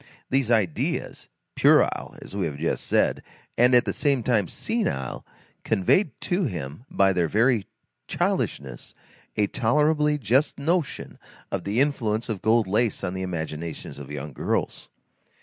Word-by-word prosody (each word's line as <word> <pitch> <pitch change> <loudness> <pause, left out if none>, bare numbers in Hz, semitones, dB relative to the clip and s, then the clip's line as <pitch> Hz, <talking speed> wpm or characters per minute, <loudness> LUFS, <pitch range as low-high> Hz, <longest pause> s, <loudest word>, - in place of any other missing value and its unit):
These 135 -3 +2
ideas, 105 -10 -1 0.3
puerile, - - +3
as - - -10
we 95 -4 0
have 70 -2 -6
just 80 +3 -2
said, - - +2 0.3
and 125 +1 +5
at 120 - +5
the - - -1
same 140 -5 +1
time 115 -5 +2
senile, 200 - -2 0.4
conveyed 130 - +2
to 180 +1 0
him, 85 - -5
by 95 0 +3
their 85 -2 +1
very 115 +3 +2 0.4
childishness, 65 -4 -2 0.4
a 105 - +4
tolerably 150 +7 +2
just 130 +4 +1
notion 160 +2 -2 0.3
of - - -3
the 105 +4 0
influence 120 -5 0
of 105 -5 -3
gold 110 +2 +3
lace 105 +3 0
on 90 - -2
the 95 - -4
imaginations 80 -4 -5
of 70 -1 -9
young 75 0 -6
girls. - - -2
110 Hz, 145 wpm, -25 LUFS, 85-135 Hz, 0.4 s, and